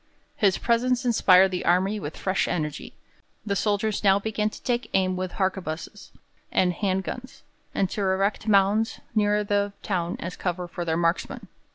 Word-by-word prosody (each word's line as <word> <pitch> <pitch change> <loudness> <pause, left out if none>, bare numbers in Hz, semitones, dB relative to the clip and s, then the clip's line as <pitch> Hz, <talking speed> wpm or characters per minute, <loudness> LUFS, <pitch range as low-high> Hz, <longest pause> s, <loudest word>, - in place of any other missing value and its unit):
His 200 -9 +2
presence 245 +2 +1
inspired 190 -5 +5
the 180 - -3
army 190 +4 +2
with 155 -4 -6
fresh 190 0 0
energy. 150 -3 -3 0.5
The 200 -2 -1
soldiers 210 +1 0
now 195 -1 +5
began 215 +1 -1
to - - -13
take 245 -1 -1
aim 185 -1 +2
with 185 0 -4
harquebuses 190 0 -3 0.4
and 180 -1 +2
'hand 190 0 -1
guns', 255 +6 -8 0.3
and 195 - +2
to 210 - -3
erect 195 +3 0
mounds 205 +2 +3
nearer 210 -1 +2
the 205 0 0
town 175 -4 -2
as 175 +2 -5
cover 180 -1 -3
for 175 0 -5
their 160 -1 0
marksmen. 170 +1 -1
195 Hz, 165 wpm, -25 LUFS, 180-210 Hz, 0.5 s, inspired